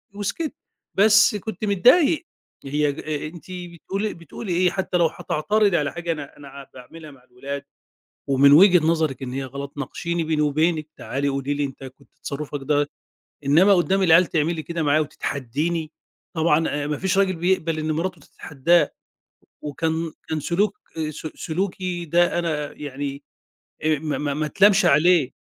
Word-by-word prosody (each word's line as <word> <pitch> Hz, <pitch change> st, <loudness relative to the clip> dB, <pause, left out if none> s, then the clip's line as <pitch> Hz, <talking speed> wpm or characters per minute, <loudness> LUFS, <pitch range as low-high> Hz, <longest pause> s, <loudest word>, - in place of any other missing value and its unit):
وسكِتّ، 280 Hz, -, -3 dB, 0.4 s
بس 215 Hz, +2 st, +5 dB
كنت 215 Hz, +1 st, -5 dB
متضايق 275 Hz, -, +4 dB, 0.4 s
هي 150 Hz, +1 st, +1 dB
ج -, -, -10 dB
أنتِ 155 Hz, +3 st, -5 dB
بتقولي 180 Hz, +4 st, -5 dB
بتقولي 175 Hz, +4 st, -7 dB
إيه 180 Hz, +1 st, +3 dB
حتى 190 Hz, -1 st, -1 dB
لو 170 Hz, -2 st, +4 dB
هتعترضي 195 Hz, +5 st, 0 dB
على 145 Hz, -2 st, -1 dB
حاجة 170 Hz, 0 st, -3 dB
أنا 150 Hz, -3 st, -6 dB
أنا 140 Hz, -1 st, -11 dB
باعملها 150 Hz, +5 st, -12 dB
مع 130 Hz, -3 st, -19 dB
الولاد 135 Hz, +3 st, -7 dB, 0.7 s
ومن 140 Hz, +1 st, +5 dB
وجهة 175 Hz, 0 st, +7 dB
نظرِك 160 Hz, -5 st, 0 dB
إن 125 Hz, -1 st, -5 dB
هي 135 Hz, +1 st, -3 dB
غلط، 140 Hz, +2 st, -7 dB
ناقشيني 170 Hz, +3 st, -3 dB
بيني 155 Hz, -1 st, 0 dB
وبينِك 155 Hz, +1 st, +1 dB
تعالي 140 Hz, +1 st, -2 dB
قولي 140 Hz, +1 st, -2 dB
لي 145 Hz, -, -1 dB
أنت 135 Hz, -1 st, -7 dB
كنت 130 Hz, 0 st, -13 dB
تصرُّفك 145 Hz, 0 st, -5 dB
ده 145 Hz, +1 st, +1 dB, 0.6 s
إنّما 175 Hz, +8 st, +6 dB
قُدّام 190 Hz, +2 st, +2 dB
العيال 170 Hz, 0 st, +6 dB
تعملي 160 Hz, 0 st, -1 dB
كده 170 Hz, 0 st, -4 dB
معايا 150 Hz, +1 st, +3 dB
وتتحدّيني؟ 155 Hz, +3 st, -3 dB, 0.4 s
طبعًا 160 Hz, 0 st, +2 dB, 0.2 s
أ -, -, -3 dB
ما 150 Hz, -1 st, -2 dB
فيش 190 Hz, 0 st, 0 dB
راجل 190 Hz, -2 st, +2 dB
بيقبل 165 Hz, -2 st, 0 dB
إن 155 Hz, 0 st, -1 dB
مراتُه 170 Hz, +1 st, -3 dB
تتحداه، 150 Hz, +3 st, +1 dB, 0.7 s
وكان 160 Hz, +2 st, -2 dB, 0.2 s
كان 155 Hz, -1 st, -2 dB
سلوك 200 Hz, -, 0 dB, 0.2 s
آآ، 155 Hz, -1 st, -2 dB
س 155 Hz, -, -8 dB
سلوكي 180 Hz, 0 st, -3 dB
ده 175 Hz, +2 st, +2 dB
أنا 150 Hz, -4 st, -3 dB
يعني 140 Hz, 0 st, -6 dB, 0.6 s
آآ، 155 Hz, -2 st, +2 dB
ما 155 Hz, -1 st, -3 dB
ما 145 Hz, -1 st, -2 dB
ما 155 Hz, +2 st, -2 dB
أتلامش 200 Hz, +5 st, +4 dB
عليه. 155 Hz, -1 st, +4 dB
160 Hz, 160 wpm, -23 LUFS, 145-180 Hz, 0.7 s, وجهة